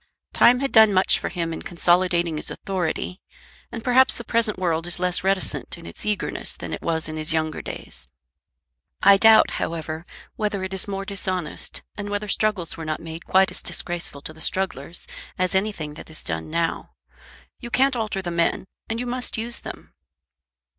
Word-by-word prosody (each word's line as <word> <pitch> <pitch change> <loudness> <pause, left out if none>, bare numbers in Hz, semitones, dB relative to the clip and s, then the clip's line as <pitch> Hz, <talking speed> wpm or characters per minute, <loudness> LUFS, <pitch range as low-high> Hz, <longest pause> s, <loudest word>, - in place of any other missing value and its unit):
"Time 250 +2 +6
had 275 - 0
done 220 -2 +8
much 190 -1 +4
for - - -3
him 170 -2 -2
in - - -6
consolidating 175 -2 +2
his - - -4
authority, 185 0 -3 0.5
and 230 - -6
perhaps 255 +1 +5
the 235 - -7
present 230 -2 +1
world 170 -2 0
is 175 - -1
less 180 0 +1
reticent 195 -1 0
in - - -11
its 85 - -6
eagerness 210 -1 -1
than - - -6
it - - -4
was 160 -2 0
in 155 0 -5
his 155 0 +1
younger 155 -1 -1
days. - - -4 1.0
I 200 0 +8
doubt, 220 +1 +7
however, 160 0 -4 0.3
whether 210 -3 -1
it 190 0 -4
is 190 - 0
more 195 -1 -3
dishonest, 185 -4 -3
and 205 0 -5
whether 205 +1 -2
struggles 205 -4 0
were 165 - -7
not 155 -1 -2
made 165 +1 -8
quite 190 0 +4
as - - -2
disgraceful 170 -5 -2
to 155 - -5
the 160 - -14
strugglers 175 -4 0 0.3
as 185 +1 +1
anything 190 -6 -1
that 150 - -11
is 160 - -6
done 80 -1 -4
now. 165 +1 -2 0.7
You 240 - -7
can't 265 +2 +3
alter 215 -4 -2
the 175 - -3
men, 170 +2 +1 0.2
and 225 +1 -2
you 250 - -2
must 245 0 -1
use 235 +2 -2
them." - - -10
185 Hz, 185 wpm, -24 LUFS, 165-210 Hz, 1.0 s, done